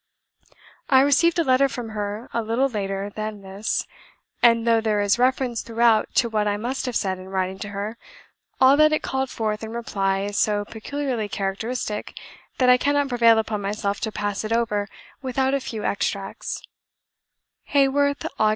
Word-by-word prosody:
I 265 -1 +6
received 305 +5 +3
a 335 - +3
letter 265 0 +3
from 245 -3 -5
her 210 +1 -4
a 230 - 0
little 230 +5 +1
later 200 -4 -3
than 215 -1 -5
this; 195 +3 -2 0.6
and 230 -1 +5
though 230 -1 +4
there 215 -2 +1
is 205 +3 +2
reference 255 -2 +1
throughout 230 -1 +2
to 240 - +4
what 215 -2 0
I 205 0 0
must 250 +5 -3
have 250 - -3
said 190 -2 -1
in 185 0 -10
writing 190 0 -2
to 205 - -5
her, 205 +3 -5 0.6
all 265 +1 +7
that 305 0 +6
it 310 - 0
called 265 0 -1
forth 215 -2 -2
in 220 +1 -6
reply 195 -4 -1
is 205 +1 -2
so 205 -1 +1
peculiarly 235 0 -3
characteristic, 210 +3 -3 0.4
that 255 - +3
I 250 0 +7
cannot 285 +1 +1
prevail 230 -2 +5
upon 220 -1 -1
myself 200 0 -2
to 220 - -3
pass 205 -1 -3
it 215 - -4
over 215 -3 0 0.3
without 265 0 0
a 275 - +2
few 225 -4 -6
extracts: 200 -1 -3 1.0
"Haworth, 285 +1 +2
Aug. 215 - +4
225 Hz, 175 wpm, -23 LUFS, 205-255 Hz, 1.0 s, all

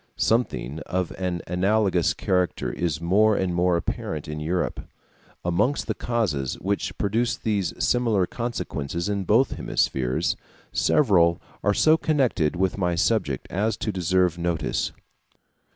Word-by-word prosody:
Something 110 - 0
of 90 -1 -1
an 90 -2 -3
analogous 95 0 +2
character 90 -1 0
is 80 -3 -1
more 100 +6 +3
and 95 -2 0
more 90 0 +2
apparent 80 -2 -4
in 75 0 -5
Europe. 85 +4 -1 0.7
Amongst 105 +11 +1
the - - -1
causes 90 - -1
which 95 -1 -2
produce 115 +4 0
these 100 -6 -1
similar 115 -6 +2
consequences 85 - -4
in 100 -2 -1
both 115 +7 +3
hemispheres, 65 -1 0 0.4
several 85 - +3 0.2
are 105 +1 +2
so 155 +1 +5
connected 130 - +1
with 95 +2 0
my 90 -2 +1
subject 85 - 0
as 105 +4 0
to 110 - -2
deserve 90 -1 +1
notice. 85 -2 -1
95 Hz, 130 wpm, -25 LUFS, 85-110 Hz, 0.7 s, so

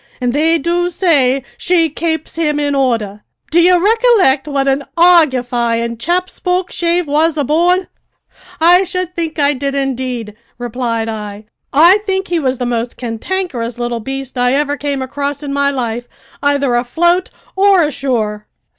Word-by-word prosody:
an' 245 -1 0
they 320 +5 +2
do 345 +3 0
say 275 -8 +2 0.2
she 345 -2 +2
kapes 320 +1 -3
him 300 -3 0
in 290 -1 0
order. 225 -7 -1 0.3
Do 340 +2 +4
ye 350 - +5
rickolict 380 - +3
what 275 -1 0
an 270 +1 +1
argufyin' 245 -9 +2
chap 355 +6 0
Spokeshave 355 -1 -1
was 310 +2 +1
aboard?" 345 +6 +2 0.7
"I 350 +3 +5
should 365 -1 -4
think 330 -2 -3
I 290 -1 +2
did, 275 +1 -3
indeed," 255 -5 -3 0.2
replied 240 -2 -3
I. 210 -1 -6 0.3
"I 340 +8 +6
think 385 -2 -2
he 345 -1 +1
was 260 -3 -1
the 245 - -3
most 240 0 -3
cantankerous 240 0 -4
little 240 -1 -3
beast 270 +2 -6
I 245 +1 +2
ever 290 0 0
came 285 -2 -3
across 280 +2 -4
in 280 -1 -4
my 280 0 +1
life, 245 -3 -3 0.3
either 285 -2 +1
afloat 345 +10 +1 0.3
or 390 -2 +4
ashore!" 235 -8 -2
280 Hz, 150 wpm, -15 LUFS, 245-345 Hz, 0.7 s, I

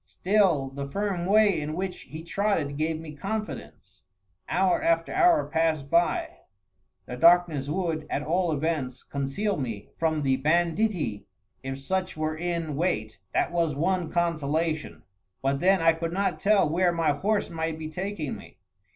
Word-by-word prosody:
Still 180 -9 +2
the 140 0 -5
firm 195 0 -2
way 205 -4 +4
in 150 +1 -4
which 185 +1 -3
he 155 +4 -7
trotted 170 -6 -1
gave 155 +2 -1
me 160 -2 -8
confidence. 210 +7 -6 0.5
Hour 190 -1 +2
after 165 0 +1
hour 355 -4 +4
passed 160 -4 0
by. 170 0 +1 0.7
The 125 - -6
darkness 165 -2 +4
would, 160 -2 -2
at 145 - -1
all 175 +2 +1
events, 145 -4 -2
conceal 140 +10 -2
me 115 -7 -5
from 160 -2 +1
the 135 -1 +2
banditti, 165 - 0 0.3
if 135 0 -5
such 185 +6 -2
were 155 0 -1
in 170 -2 -2
wait 110 - -1 0.2
that - - +2
was 165 -4 0
one 175 +2 0
consolation; 155 - -1 0.4
but 135 +1 +1
then 185 +1 +3
I 165 0 +6
could 165 +1 -4
not 185 -4 0
tell 200 -2 +4
where 175 +3 +2
my 165 -3 +1
horse 205 +7 0
might 160 -1 -2
be 160 -1 -5
taking 180 -2 -4
me. - - -13
165 Hz, 155 wpm, -27 LUFS, 150-185 Hz, 0.7 s, I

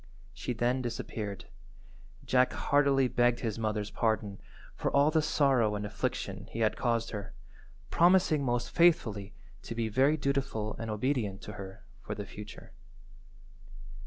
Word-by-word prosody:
She 125 - -4
then 120 +3 0
disappeared. 110 -4 -5 0.8
Jack 125 0 +3
heartily 140 -2 +3
begged 120 -1 +2
his 115 -2 -2
mother's 105 -1 -2
pardon 110 -3 -1 0.3
for - - -1
all 140 +2 +4
the 160 0 +3
sorrow 135 -8 +2
and 105 0 -3
affliction 105 - -3
he 115 - -4
had 110 - +2
caused 115 -2 0
her, 100 -2 -6 0.6
promising 175 -4 +4
most 120 -2 -1
faithfully 110 - +2 0.3
to 115 - -7
be 115 -1 -1
very 135 +8 +3
dutiful 140 -6 -1
and 115 - -4
obedient 105 -3 -1
to 105 - -7
her 95 -2 -9 0.2
for - - -5
the - - -5
future. - - -10
115 Hz, 140 wpm, -30 LUFS, 105-140 Hz, 0.8 s, all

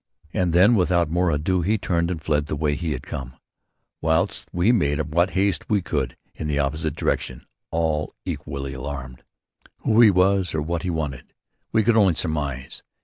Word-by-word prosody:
And 90 -4 +1
then 95 +7 +6
without 85 -5 +2
more 90 +1 +2
ado, 80 +4 +1
he 105 +6 +1
turned 85 -3 0
and 90 -3 -2
fled 75 -1 0
the - - -2
way 75 0 0
we 80 +2 -2
had 65 - -6
come 65 -1 -6 0.7
whilst 80 -5 0
we 90 +6 +3
made 75 -11 +1
what 85 +3 +3
haste 95 +1 0
we 100 -4 +2
could 65 -7 -2 0.2
in 75 - -5
the 75 -1 0
opposite 75 +1 -1
direction, - - -2 0.2
all 80 -2 -1
equally 70 -1 -4
alarmed. 65 -1 -6 0.6
Who 110 +2 +4
he 115 - +9
was 95 -2 +2
or 75 - 0
what 85 +1 -2
he 90 - -3
wanted, 75 -6 -4 0.4
we 110 - +3
could 115 +1 +3
only 95 -6 +5
surmise. 70 -6 -3
80 Hz, 180 wpm, -23 LUFS, 75-90 Hz, 0.7 s, he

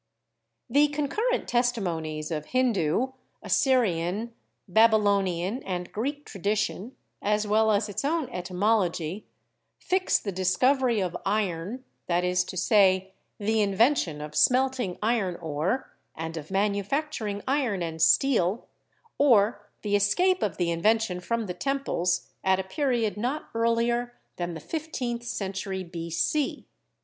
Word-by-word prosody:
The 290 +1 +4
concurrent 300 - -1
testimonies 175 -11 -1
of 155 -2 -3
Hindu, 240 -3 +1 0.3
Assyrian, 220 - +1 0.3
Baby 220 +4 +5
lonian 200 +1 +1
and 180 -2 -4
Greek 285 +7 -3
tradition, 210 +3 -2 0.3
as 210 +1 +1
well 220 +1 +3
as 210 +1 +1
its 205 - -4
own 310 0 0
etymology, 185 -2 -1 0.5
fix 370 0 +1
the 200 - -4
discovery 235 +7 +2
of 180 -2 -2
iron 200 +3 -2
— - - -48
that 175 0 +1
is 180 0 +2
to 185 - -7
say, 190 -1 +3 0.2
the 215 +1 +1
invention 200 - +2
of 150 0 -7
smelting 250 - +2
iron 215 -6 +1
ore 165 - -2 0.2
and 160 +1 -5
of 155 -1 -7
manufacturing 205 +3 -1
iron 255 -9 0
and 160 -1 -5
steel, 185 +3 +3 0.5
or 210 -6 +3
the 205 -1 +1
escape 360 - +2
of 185 -6 -1
the 175 -2 0
invention 205 +2 +1
from 230 +5 -2
the 180 - -4
temples 180 -6 -1
— - - -47
at 190 0 +3
a - - -1
period 230 0 -1
not 255 +8 -3
earlier 235 +1 +1 0.2
than 175 -1 -3
the - - -6
fifteenth 250 - -4
century 195 -4 -3
b.c. 170 - -2
205 Hz, 130 wpm, -27 LUFS, 180-245 Hz, 0.5 s, Baby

